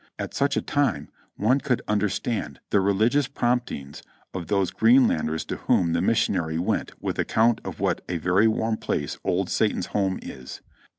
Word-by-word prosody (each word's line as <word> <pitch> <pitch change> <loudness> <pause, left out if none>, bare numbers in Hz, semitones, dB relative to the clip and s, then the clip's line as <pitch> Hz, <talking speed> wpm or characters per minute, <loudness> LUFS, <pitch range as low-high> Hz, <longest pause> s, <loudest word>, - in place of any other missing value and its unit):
At - - -5
such 140 +1 +1
a - - 0
time 145 -3 0 0.3
one 125 +7 +2
could 125 -3 -1
understand 105 +2 -1
the 100 - +4
re 100 +1 +2
ligious 120 +8 +2
promptings 120 - -2 0.3
of 90 -3 -5
those 100 -3 +1
Greenlanders 110 -10 +3
to - - -4
whom 85 -2 +1
the 85 - +1
mission 100 +1 +2
ary 80 -3 -1
went 85 - -2
with - - -3
account 115 +1 +2
of - - -7
what - - 0
a 90 - -1
very 90 +6 +3
warm 110 0 0
place 75 - -3
old - - 0
Satan's - - +1
home 95 -2 +1
is. 65 -1 -9
105 Hz, 175 wpm, -25 LUFS, 90-120 Hz, 0.3 s, the